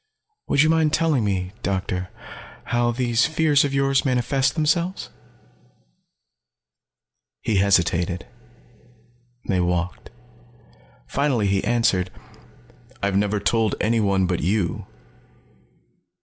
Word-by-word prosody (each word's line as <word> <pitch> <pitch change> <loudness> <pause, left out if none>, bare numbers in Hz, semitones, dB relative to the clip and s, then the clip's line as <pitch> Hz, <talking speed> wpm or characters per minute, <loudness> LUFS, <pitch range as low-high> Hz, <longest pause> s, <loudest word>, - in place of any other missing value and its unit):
"Would 145 - +3
you 155 - +3
mind 160 -2 +2
telling 155 -8 +2
me, 95 -3 -2
Doctor, 95 -2 -2 0.5
how 120 0 0
these 120 +2 +1
fears 155 -3 +3
of 145 - -1
yours 135 0 +2
manifest 130 +1 +1
themselves?" 170 +4 -1 2.3
He 110 - 0
hesitated; 90 -2 +1 1.2
they 95 -4 +1
walked. 90 0 -2 1.0
Finally 130 - 0
he 95 0 +1
answered. 110 -6 +1 0.9
"I've 100 -1 0
never 105 +1 +1
told 110 +1 +1
anyone 100 -4 +1
but 90 -1 -1
you. 95 +1 -1
110 Hz, 95 wpm, -22 LUFS, 95-135 Hz, 2.3 s, Would